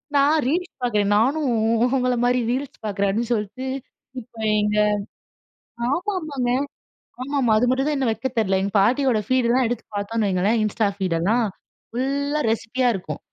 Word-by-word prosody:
நான் 285 +3 +4
ரீல்ஸ் 350 +6 -1
பாக்குறேன். 210 -4 +1
நானும் 280 +6 +2 0.5
உங்கள 250 -1 +1
மாதிரி 250 +1 +3
ரீல்ஸ் 270 +2 -3
பாக்குறேன், 200 -1 0
அப்படின்னு 230 +4 -2
சொல்லிட்டு 210 +4 -3 0.6
இப்ப 235 +1 -21 0.2
எங்க 210 0 0 1.1
ஆமாமாங்க. 310 -7 -2 0.7
ஆமாம்மா. 260 -4 +1
அது 245 - +2
மட்டும் 265 +2 +1
தான் 300 - 0
இன்னும் 265 -4 +1
வைக்க 265 +4 -3
தெரியல 195 -3 +2
"எங்க 200 - -2
பாட்டியோட 245 +2 +2
ஃபீடுலாம் 255 0 +3
எடுத்து 240 -1 -3
பார்த்தோம்ன்னு 210 +1 -1
வையுங்களேன் 195 +5 +1
Insta 215 0 +1
ஃபீடெல்லாம் 190 +6 +1 0.5
ஃபுல்லா 280 +4 -1
ரெசிப்பியா 245 +3 0
இருக்கும். 155 -5 -6
245 Hz, 140 wpm, -23 LUFS, 210-270 Hz, 1.1 s, நான்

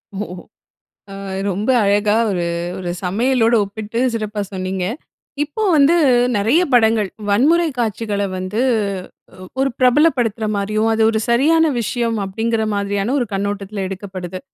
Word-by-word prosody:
ஓ - - -5 1.0
அ - - -7 0.4
ரொம்ப 205 +6 -1
அழகா 205 +1 +2 0.2
ஒரு 180 -3 -1 0.3
ஒரு 180 -2 -4
சமையலோடு 230 +4 +2
ஒப்பிட்டு 215 +3 -6 0.2
சிறப்பா 215 -2 -3
சொன்னீங்க. 185 -1 -3 0.6
இப்போ 315 +9 -5
வந்து, 290 +3 +5 0.4
நெறைய 235 - +3
படங்கள் 220 -4 +3 0.2
வன்முறை 310 +11 +3
காட்சிகள 215 -2 -1
வந்து, 185 +5 -3 0.8
ஒ - - -8 0.2
ஒரு 275 - +2
பிரபலப்படுத்துற 250 -5 +3
மாரியும், 215 +2 0
அது 225 0 +1
ஒரு 220 - -1
சரியான 310 +7 +4
விஷயம், 230 0 -1
அப்படிங்கிற 220 +3 -1
மாதிரியான 200 +4 -1
ஒரு 245 - 0
கண்ணோட்டத்துல 200 0 -3
எடுக்கப்படுது. 185 -2 -7
215 Hz, 125 wpm, -19 LUFS, 200-240 Hz, 1.0 s, வந்து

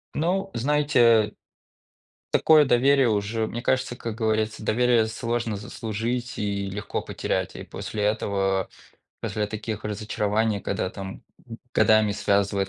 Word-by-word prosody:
Ну 190 +5 0
знаете 120 -5 +3 1.0
такое 155 -2 +6
доверие 135 0 +4
уже, 110 +1 0
мне 120 +2 -5
кажется, 125 -1 0
как 115 -2 -5
говорится, 110 -1 -1
доверие 120 0 +3
сложно 115 0 -2
заслужить, 115 +4 -4
и 100 -1 -1
легко 100 +2 -4
потерять. - - -3
И - - -7
после 105 - -6
этого, 100 -2 0 0.5
после 105 -1 -1
таких 110 0 -5
разочарований, 105 0 -1
когда 95 -2 -2
там, 95 -1 -8 0.3
м, 115 -1 -8
годами 110 -1 +4
связывает 100 -1 +1
110 Hz, 125 wpm, -25 LUFS, 105-120 Hz, 1.0 s, такое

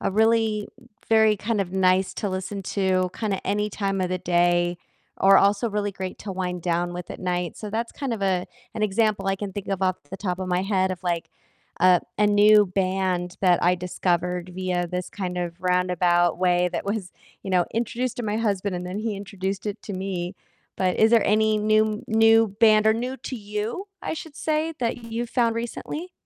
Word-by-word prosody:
a - - -1
really 220 -1 +2 0.4
very 220 -1 +5
kind 210 +1 -1
of 185 -2 -3
nice 185 0 +2
to 205 - -2
listen 190 +1 -4
to 185 -2 0
kinda 205 -4 -3
any 210 +1 0
time 195 -2 -2
of 185 - 0
the 185 - 0
day, 175 0 +2 0.4
or 195 0 +7
also 205 +3 +3
really 205 -1 -2
great 185 -1 -6
to 195 - -6
wind 180 -2 -3
down 175 0 -1
with 180 -1 -7
at - - -7
night, 180 -2 -2
so 210 - -6
that's 230 +3 -3
kind 270 -4 -3
of 205 - -6
a 185 -2 +1 0.3
an 215 - -3
example 210 -1 +1
I 195 0 +1
can 200 -1 -5
think 200 +1 -6
of 195 -1 -2
off 185 -1 +2
the 195 - -6
top 185 -2 -3
of 185 -1 -4
my 180 0 +1
head 190 -1 +1
of, 185 -1 -5
like, 170 -2 -2 0.5
uh, 180 -1 +5 0.2
a 210 - +3
new 210 0 +6
band 185 -1 -1
that 180 -2 +4
I 180 +1 +4
discovered 180 0 -1
via 180 -1 -1
this 180 +1 -4
kind 180 -3 -4
of 175 0 -4
roundabout 180 -1 +2
way 180 -1 +2
that 175 - -3
was, 200 -3 -3 0.3
you 195 - -5
know, 180 -2 +3
introduced 240 +2 -2
to 245 - -3
my 210 0 -1
husband, 200 -3 -1
and 180 0 -4
then 185 +3 -4
he 220 -1 -2
introduced 195 0 -4
it 205 +1 -4
to 205 - -6
me, 185 -1 -4 0.4
but 185 -1 +1
is 220 0 +5
there 230 -1 +4
any 215 +1 +3
new 215 0 +2
new 225 0 +5
band, 215 -1 +6
or 220 - +5
new 250 +3 -3
to 255 +1 -6
you, 210 - -4
I - - -3
should 315 -1 -9
say, 315 +1 -1
that 235 0 -2
you've 230 +1 -4
found 235 -2 +2
recently? 300 +9 -5
195 Hz, 205 wpm, -24 LUFS, 180-215 Hz, 0.5 s, or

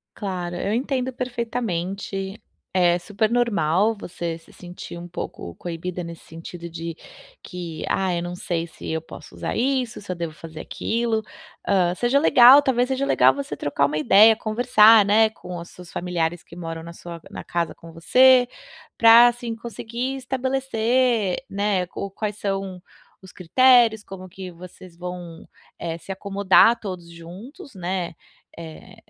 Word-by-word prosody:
Claro, 180 -4 -4
eu 200 - -2
entendo 260 0 -1
perfeitamente. 205 -5 -4 0.3
É 175 -1 +3
super 210 +4 -1
normal 215 -3 +1
você 170 -2 -5
se 165 - -21
sentir 175 -1 -10
um 175 +1 -9
pouco 85 - -7
coibida 175 +1 -5
nesse 170 0 -10
sentido 170 +1 -9
de 165 0 -6 0.5
que: 175 -4 -7
"Ah, 190 -2 0
eu 170 - -2
não 175 0 -5
sei 170 -2 -3
se 165 - -11
eu 160 - -1
posso 160 - -13
usar - - -4
isso, 255 -1 -1
se 200 - -11
eu - - -2
devo 170 -2 -5
fazer 160 -1 -10
aquilo". 225 +3 -2 0.4
Hã, 180 -3 +2
seja 245 +7 +2
legal, 260 -2 +8
talvez 250 -2 +1
seja 270 +1 -1
legal - - +4
você 280 0 -5
trocar 145 - 0
uma 150 +1 -3
ideia, 215 +8 +6
conversar, 220 -1 +5
né, 215 +2 +4
com 180 -4 -9
os 170 - -9
seus 180 -1 -13
familiares 175 -1 -2
que - - -14
moram 165 -1 -6
na 170 +1 -9
sua 170 -1 -10
na - - -7
casa 170 -1 -2
com 165 - -14
você. 250 +9 +5 0.5
Pra 230 +1 +8
assim 240 -1 -4
conseguir 235 +3 -5
estabelecer, 255 -5 0
né, 200 -2 0
ou 200 - -4
quais 210 +1 -4
são 195 -2 -4 0.4
os 190 - -14
critérios, 230 +3 +4
como 185 -1 -10
que 185 +1 -9
vocês 180 0 -13
vão, 175 -2 -8 0.3
eh, 165 -1 -4
se 190 - -7
acomodar 200 +4 +4
todos 180 -6 -7
juntos, 200 - -12
né, 180 -2 -3 0.4
eh, 165 -2 -11
195 Hz, 155 wpm, -23 LUFS, 175-235 Hz, 0.5 s, legal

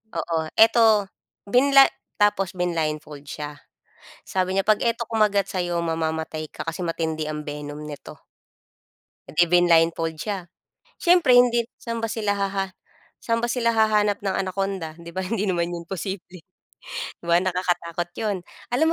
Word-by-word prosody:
Oo. 165 -1 -1
Ito 220 -3 +5 0.3
binla 275 +6 +6 0.3
tapos 205 -3 +1
blinildfold 155 -4 -3
siya. 145 0 -6 0.7
Sabi 185 0 0
niya 195 - 0
'pag 215 -1 +3
ito 235 -1 0
kumagat 210 -3 +2
sa'yo 175 -3 -2
mamamatay 160 -1 -2
ka - - -7
kasi 165 +2 -4
matindi 160 -2 -2
ang 150 0 -5
venom 150 0 -6
nito. 145 -1 -10 1.0
Eh, 135 - -12
di 175 - +6
blinildfold 165 -2 +3
siya. 190 +1 -4 0.5
Siyempre 345 -6 +5
hindi 245 -1 +5 0.2
saan 230 -1 -4
ba 225 - -2
sila 210 -3 0
haha 195 -1 -2 0.4
saan 230 - 0
ba 240 - 0
sila 230 -2 +1
hahanap 210 -2 +2
ng 195 - +1
Anaconda, 190 -4 -2
'di 170 0 -11
ba, 190 - -3
hindi 205 +2 -2
naman 175 -3 0
'yon 170 -1 -5
posible. 185 -1 -6 0.8
'Di - - -13
ba 170 - +6
nakakatakot 175 -2 -1
'yon. 210 -3 -1 0.4
Alam 315 +6 +3
185 Hz, 145 wpm, -24 LUFS, 165-210 Hz, 1.0 s, binla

